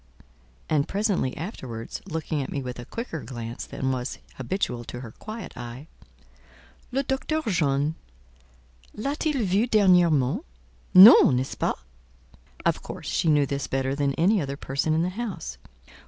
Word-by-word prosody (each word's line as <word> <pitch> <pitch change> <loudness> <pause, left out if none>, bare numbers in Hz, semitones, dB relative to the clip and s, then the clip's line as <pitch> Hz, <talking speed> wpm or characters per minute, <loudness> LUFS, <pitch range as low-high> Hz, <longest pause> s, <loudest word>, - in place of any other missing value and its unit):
And 150 -2 +1
presently 200 - 0
afterwards, 130 - -6
looking 155 -2 -2
at 135 - -5
me 140 - -2
with 125 -1 -6
a 120 - -7
quicker 230 - -5
glance 120 -2 -6
than 130 0 -2
was 130 0 -3 0.2
habitual 130 -3 -2
to 125 - -7
her 115 -4 -8
quiet 215 - -8
eye, 120 +3 -8 1.1
"Le 270 +2 0
Docteur 295 +4 -1
John 145 -3 +1 1.0
l'a 275 +7 -2
t 310 - -1
il 270 -7 0
vue 200 +6 +2
dernièrement? 175 - +4 0.5
Non, 185 - +10
n'est 125 - +1
ce - - -3
pas?" - - 0 0.9
Of - - +1
course - - -8
she - - 0
knew 145 -2 +4
this 140 0 -3
better 135 0 -1
than 140 -1 0
any 190 +4 +3
other 140 -1 -4
person 140 +3 -1
in 160 - +2
the 180 - 0
house. 185 - -5
150 Hz, 155 wpm, -25 LUFS, 130-200 Hz, 1.1 s, Non